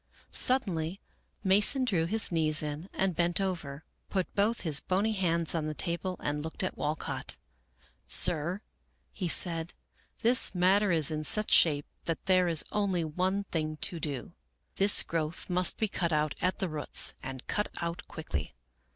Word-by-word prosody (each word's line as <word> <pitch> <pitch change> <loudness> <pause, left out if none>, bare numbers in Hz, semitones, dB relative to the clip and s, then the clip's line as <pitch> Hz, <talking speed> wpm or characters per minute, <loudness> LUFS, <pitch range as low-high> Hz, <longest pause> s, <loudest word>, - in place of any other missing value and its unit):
Suddenly 190 -9 +1 0.4
Mason 210 +7 +4
drew 180 -9 +1
his 220 +2 -1
knees 155 -2 +1
in 150 +5 -5
and 190 -2 -1
bent 170 +1 +1
over, 160 -7 -4 0.2
put 190 -3 -2
both 215 +3 +1
his 155 -4 +3
bony 200 +4 0
hands 170 -5 0
on 160 -2 -2
the 155 - -4
table, 180 +2 -2
and 150 0 -2
looked 160 +4 -4
at 185 - -2
Walcott. 150 +1 -4 0.4
" 65 0 -31 0.2
Sir," 175 +5 +3 0.5
he 185 - -3
said, 165 -1 +1 0.2
" - - -35
this 240 -4 +5
matter 190 +3 +3
is 160 -3 +1
in 155 0 -3
such 210 +7 +1
shape 145 -3 +4 0.2
that 165 - -3
there 185 -1 +3
is 165 -3 0
only 195 -5 0
one 185 +5 -1
thing 155 -4 -3
to 170 - +3
do. 145 -4 -5 0.4
This 200 +1 +6
growth 165 +2 -4
must 180 0 +1
be 220 - 0
cut 175 -4 -2
out 150 -1 +1
at 185 +1 0
the 190 - -2
roots, 155 -3 0
and 130 -1 -7
cut 210 - -1
out 170 0 -5
quickly. 80 - -5
170 Hz, 170 wpm, -30 LUFS, 155-190 Hz, 0.5 s, This